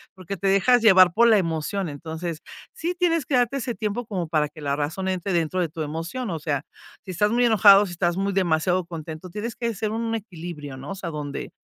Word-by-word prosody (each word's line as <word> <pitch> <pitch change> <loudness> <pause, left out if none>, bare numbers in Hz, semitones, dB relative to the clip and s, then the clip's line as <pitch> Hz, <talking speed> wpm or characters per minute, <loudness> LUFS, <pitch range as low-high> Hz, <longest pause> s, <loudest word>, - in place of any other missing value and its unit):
porque 185 +1 -6
te 195 - -2
dejas 220 +5 +4
llevar 185 -5 +7
por 235 +5 +5
la 220 -2 +6
emoción. 170 +2 -2
Entonces, 160 +2 -6 0.4
sí 345 +2 -3
tienes 335 -5 +1
que 270 - 0
darte 245 +2 +2
ese 245 -2 -3
tiempo 215 +4 -3
como 185 -6 -3
para 150 -2 +1
que 155 0 -13
la 140 -1 -1
razón 155 +6 -3
entre 190 0 -2
dentro 170 +1 0
de 170 - -1
tu 160 +1 -7
emoción. 165 +11 -4
O 165 - -2
sea, 145 -3 -2 0.4
si 185 - -6
estás 210 +5 +1
muy 245 +1 +3
enojado, 205 -3 +7
si 175 - -7
estás 175 0 0
muy 195 +1 -1
demasiado 180 0 +1
contento, 165 +1 -8
tienes 215 +5 -5
que 235 -1 -2
ser 210 +2 -2
un 225 +1 -2
equilibrio, 170 -9 -7
¿no?, 135 +2 -8
o - - -4
sea, 185 -3 -5
donde 150 -3 -5
185 Hz, 225 wpm, -24 LUFS, 160-215 Hz, 0.4 s, llevar